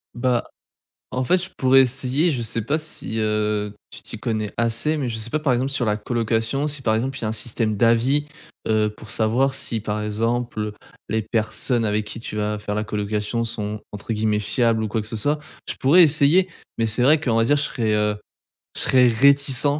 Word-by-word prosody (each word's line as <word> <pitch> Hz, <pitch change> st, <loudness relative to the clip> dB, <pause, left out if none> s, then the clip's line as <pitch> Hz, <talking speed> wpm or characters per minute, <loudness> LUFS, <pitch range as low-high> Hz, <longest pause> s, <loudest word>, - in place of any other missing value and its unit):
Bah, 120 Hz, -1 st, +1 dB, 0.7 s
en 130 Hz, 0 st, -1 dB
fait, 185 Hz, +8 st, +3 dB
je 185 Hz, -, -5 dB
pourrais 135 Hz, 0 st, +5 dB
essayer. 135 Hz, +6 st, +1 dB
Je 125 Hz, -, -2 dB
sais 115 Hz, 0 st, -2 dB
pas 140 Hz, +6 st, 0 dB
si, 155 Hz, -7 st, -4 dB
heu, 105 Hz, -1 st, -1 dB, 0.2 s
tu -, -, -10 dB
t'y 110 Hz, -, -9 dB
connais 110 Hz, -3 st, -2 dB
assez, 115 Hz, +7 st, +1 dB
mais 140 Hz, -4 st, -2 dB
je 115 Hz, -, -3 dB
sais 110 Hz, +1 st, -4 dB
pas, 155 Hz, -, -1 dB
par 145 Hz, -4 st, +1 dB
exemple, 130 Hz, +3 st, 0 dB
sur 130 Hz, -3 st, 0 dB
la 105 Hz, -, +1 dB
colocation, 115 Hz, +5 st, -1 dB
si 145 Hz, -2 st, -3 dB
par 110 Hz, -3 st, +1 dB
exemple, 130 Hz, +4 st, -2 dB
il -, -, -9 dB
y -, -, -2 dB
a -, -, 0 dB
un 110 Hz, -, -1 dB
système 110 Hz, -1 st, -1 dB
d'avis. 120 Hz, +6 st, +3 dB, 0.4 s
Heu, 110 Hz, -1 st, +2 dB
pour 105 Hz, 0 st, -12 dB
savoir 120 Hz, +6 st, +1 dB
si, 115 Hz, -4 st, -1 dB
par 105 Hz, 0 st, -3 dB
exemple, 110 Hz, 0 st, -2 dB, 0.4 s
les 110 Hz, +1 st, 0 dB
personnes 110 Hz, +2 st, 0 dB
avec 105 Hz, 0 st, 0 dB
qui 105 Hz, +2 st, -6 dB
tu 115 Hz, -, -7 dB
vas 105 Hz, 0 st, -1 dB
faire 105 Hz, 0 st, -4 dB
la 105 Hz, -, -1 dB
colocation 105 Hz, +2 st, -2 dB
sont, 105 Hz, -2 st, -4 dB
entre 105 Hz, +2 st, -5 dB
guillemets, 105 Hz, -1 st, +1 dB
«fiables» 110 Hz, +1 st, +1 dB
ou -, -, -1 dB
quoi 110 Hz, +2 st, -2 dB
que 105 Hz, -, -8 dB
ce 115 Hz, -, -4 dB
soit. 145 Hz, +8 st, +1 dB, 0.3 s
Je -, -, -2 dB
pourrais 160 Hz, +7 st, +6 dB
essayer. 155 Hz, +5 st, +4 dB, 0.3 s
Mais 115 Hz, -, +1 dB
c'est 110 Hz, +3 st, +1 dB
vrai 150 Hz, +4 st, +5 dB
qu'on 120 Hz, -6 st, 0 dB
va 115 Hz, -, +3 dB
dire 145 Hz, +3 st, +3 dB
je 145 Hz, -, 0 dB
serai, 110 Hz, -6 st, -1 dB
heu 105 Hz, 0 st, +1 dB, 0.6 s
je -, -, -2 dB
serais 130 Hz, -1 st, +5 dB
réticent 140 Hz, +3 st, +4 dB
115 Hz, 220 wpm, -22 LUFS, 105-135 Hz, 0.7 s, pourrais